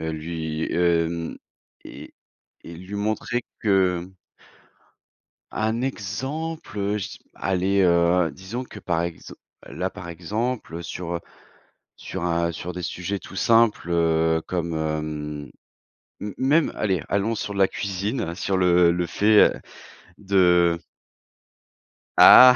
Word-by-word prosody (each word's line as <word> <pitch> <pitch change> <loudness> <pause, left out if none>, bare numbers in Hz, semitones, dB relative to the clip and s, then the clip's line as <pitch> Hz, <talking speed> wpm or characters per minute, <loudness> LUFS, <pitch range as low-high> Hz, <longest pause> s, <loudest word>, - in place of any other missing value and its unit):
heu, 80 0 -2
lui, 80 0 -4
hem 85 -1 +1 0.5
et - - -11 0.5
et 85 - -9
lui 95 +4 -9
montrer 110 +3 -1 0.2
que 95 -4 +2 1.4
Un 110 +2 -1
exemple? 135 +5 -4
Heu, 100 +1 0
je 95 -3 -3
dis - - -11 0.2
allez, 95 +1 +1
heu, 85 -1 +3
disons 95 - -6
que 105 - -11
par 85 -3 -1
exem 85 -2 -6 0.3
là - - -3
par 85 - -9
exemple, 105 +5 -3
heu, 85 - -5
sur, 85 +1 -5
heu, - - -2 0.8
sur, - - -6
un 85 0 +1
sur 90 +2 -6
des 90 - -5
sujets 90 +4 -3
tout 95 - -12
simples, 115 -4 +3
heu, 80 -1 +2
comme, 85 -2 -2
hem, 75 -2 -3 0.7
m 105 -1 -4
même, 145 +5 +3
allez, 95 -7 0
allons 100 +3 0
sur 105 - -4
la 100 -1 +4
cuisine, 100 0 -3
sur 95 +1 -1
le 90 -1 +5
le 90 0 0
fait, 105 +4 +4
heu, - - -12 0.6
de 90 -4 +3 1.4
ah! 125 0 +10
90 Hz, 130 wpm, -24 LUFS, 85-105 Hz, 1.4 s, ah